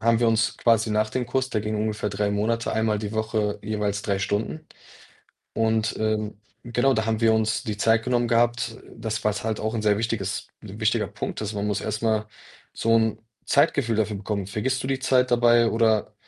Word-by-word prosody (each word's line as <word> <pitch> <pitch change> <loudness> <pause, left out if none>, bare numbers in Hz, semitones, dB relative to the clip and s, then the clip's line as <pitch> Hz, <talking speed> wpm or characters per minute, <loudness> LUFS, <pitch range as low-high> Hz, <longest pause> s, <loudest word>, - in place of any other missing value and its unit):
haben 115 +1 +3
wir 120 - +4
uns 115 0 +1
quasi 115 -2 +2
nach 110 0 +1
dem 125 +1 -2
Kurs 130 +1 -1
der 110 - 0
ging 105 +1 -3
ungefähr 105 0 -1
3 100 +1 -1
Monate, 115 +3 0
einmal 110 -1 +1
die 105 0 -5
Woche 110 -1 -1
jeweils 105 -1 -2
3 100 -2 -1
Stunden 105 +10 -2 0.9
und, 110 -1 +1
ähm, 110 -1 -1 0.2
genau, 120 +3 +2
da 110 -2 0
haben 110 0 -1
wir 115 -1 +5
uns 110 +1 0
die 105 -4 -4
Zeit 115 +2 +3
genommen 120 -1 +1
gehabt, 120 -1 +1 0.2
das, 110 0 -4
was 105 -1 0
halt 110 -1 -1
auch 110 +1 -2
sehr 105 -1 +3
wichtiges 110 -4 -2
'n - - -10
wichtiger - - +1
Punkt - - -5
ist, 105 0 -3
man 100 0 -2
muss 100 -1 0
erst 110 0 -3
mal 110 -1 +1 0.5
so 115 0 +2
'n 110 -1 +2 0.3
Zeitgefühl 135 -4 +2
dafür 105 -1 0
bekommen. 100 -1 -3
Vergisst 130 +6 -2
du - - -3
die 135 -1 -1
Zeit 130 -1 +2
dabei 120 -1 +5
oder 110 -2 +1
110 Hz, 200 wpm, -25 LUFS, 105-115 Hz, 0.9 s, wir